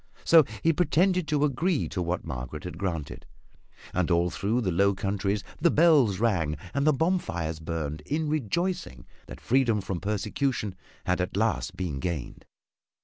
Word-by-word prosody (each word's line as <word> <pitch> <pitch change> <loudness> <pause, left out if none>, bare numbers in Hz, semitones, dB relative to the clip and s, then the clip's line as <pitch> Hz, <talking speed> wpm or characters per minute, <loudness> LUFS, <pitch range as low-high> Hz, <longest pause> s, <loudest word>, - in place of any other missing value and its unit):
So 165 -3 +7 0.2
he 165 - +4
pretended 180 +1 +2
to 150 -1 +1
agree 150 +4 0
to 90 - -3
what 85 +1 -2
Margaret 65 +4 -6
had 90 -2 -7
granted, 85 -7 -4 0.7
and 90 -1 0
all 85 0 +2
through 110 +5 0
the 95 -5 0
Low 100 +3 +3
Countries 100 +1 -1 0.2
the 170 - +4
bells 145 - +4
rang 85 -10 +1 0.2
and 140 +2 +1
the - - +7
bonfires 110 - -1
burned 80 -2 -4
in 155 +1 -1
rejoicing 155 - -2 0.2
that - - -9
freedom 120 -4 +2
from 95 -2 -4
persecution 105 +2 -1 0.3
had 90 0 +1
at 90 +1 -3
last 100 -3 0
been 85 -7 -3
gained. 80 -5 -4
100 Hz, 155 wpm, -27 LUFS, -, 0.7 s, So